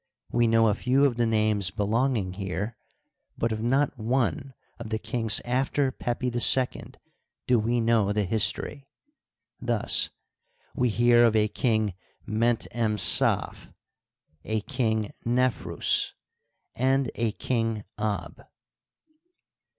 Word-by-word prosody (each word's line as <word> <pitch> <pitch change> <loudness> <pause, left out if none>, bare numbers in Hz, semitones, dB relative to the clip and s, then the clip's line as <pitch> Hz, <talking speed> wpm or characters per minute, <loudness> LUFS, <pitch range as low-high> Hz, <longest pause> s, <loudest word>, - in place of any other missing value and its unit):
We 120 0 +2
know 115 0 +4
a 105 - +3
few 130 +6 +2
of 125 -4 0
the 120 -1 +1
names 110 -4 +1
belonging 105 0 -1
here, 95 +3 -4 0.6
but 115 - -1
of 110 0 -3
not 135 +2 0
one 130 +4 -1 0.2
of 115 -2 -7
the 110 - -1
king^ 115 -2 0
after 130 +2 0
Pepi 125 0 -3
II 125 +1 +2 0.5
do 125 -2 +3
we 120 +3 0
know 115 -3 +2
the 105 0 0
history. 110 +7 0 0.7
Thus - - +2 0.6
we 125 -1 +1
hear 120 +2 +4
of 115 -2 +3
a 105 -1 +3
King 110 -3 0 0.3
Ment 115 +2 0
em 110 -2 -1
Saf, - - +1 0.7
a 110 0 -2
King 110 -1 -2
Nefrus^ 125 +1 +1 0.6
and 130 0 0
a 115 -2 -2
King 115 -4 -2 0.2
Ab. 105 -1 -3
115 Hz, 120 wpm, -26 LUFS, 110-125 Hz, 0.7 s, know